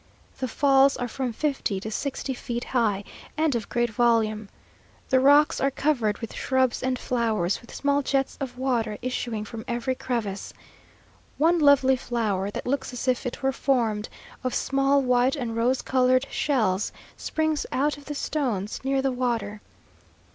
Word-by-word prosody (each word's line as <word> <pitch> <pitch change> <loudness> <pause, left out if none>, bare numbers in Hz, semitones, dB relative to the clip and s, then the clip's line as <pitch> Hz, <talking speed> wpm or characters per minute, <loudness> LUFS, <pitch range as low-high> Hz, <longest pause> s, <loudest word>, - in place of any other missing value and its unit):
The 260 - -1
falls 270 +2 +4
are 245 - -2
from 255 +1 -3
fifty 255 -6 -1
to 215 +3 -6
sixty 275 +2 -3
feet 240 -1 -4
high, 215 -6 0 0.3
and 310 -2 +2
of 230 -3 -3
great 240 -1 0
volume. 220 -3 +1 0.6
The 260 - +4
rocks 285 +3 +5
are 275 - +3
covered 250 -7 0
with 230 - -7
shrubs 260 -2 +1
and 260 0 0
flowers, 220 -8 0
with 235 - -15
small 285 0 +1
jets 270 -1 0
of 250 -2 -5
water 235 -5 0
issuing 240 -4 -3
from 220 +1 -7
every 240 +2 -1
crevice. 230 -6 -4 0.8
One 335 +3 +3
lovely 280 -3 +5
flower, 215 -6 -1
that - - -6
looks 265 +1 -1
as 245 +1 -5
if 255 0 +1
it 250 - -6
were 270 - +3
formed 235 -6 0 0.3
of 255 - -1
small 275 0 +2
white 250 +2 +3
and 240 -5 -3
rose 245 +3 +1
coloured 255 0 +3
shells, 215 -9 +1 0.2
springs 315 -1 -1
out 290 +3 +1
of 290 -1 -14
the 295 - -5
stones 240 -10 -2
near 270 0 +1
the 270 - +1
water. 230 -5 -2
255 Hz, 160 wpm, -25 LUFS, 225-275 Hz, 0.8 s, rocks